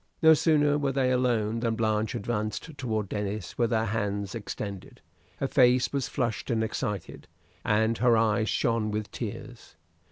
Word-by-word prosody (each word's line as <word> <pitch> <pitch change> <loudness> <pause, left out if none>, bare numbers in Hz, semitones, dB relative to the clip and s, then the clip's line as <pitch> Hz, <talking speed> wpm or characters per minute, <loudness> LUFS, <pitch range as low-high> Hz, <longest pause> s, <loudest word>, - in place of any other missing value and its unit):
No 160 0 +9
sooner 150 -2 +3
were 140 -2 0
they 130 -1 +1
alone 115 -3 +1
than 115 -1 0
Blanche 110 0 0
advanced 110 +6 -3
toward 110 -6 -2
Denis 105 -1 -4
with 120 -1 +3
her 110 -1 +1
hands 100 -2 -2
extended. 100 -3 -6 0.4
Her 135 - -1
face 125 -1 +3
was 140 -3 -1
flushed 120 -4 -2
and 115 -2 +1
excited, 105 -4 -4 0.4
and 110 +2 +1
her 120 -1 +4
eyes 110 0 +2
shone 115 -2 +1
with 105 0 -3
tears. - - -7
115 Hz, 155 wpm, -27 LUFS, 105-125 Hz, 0.4 s, No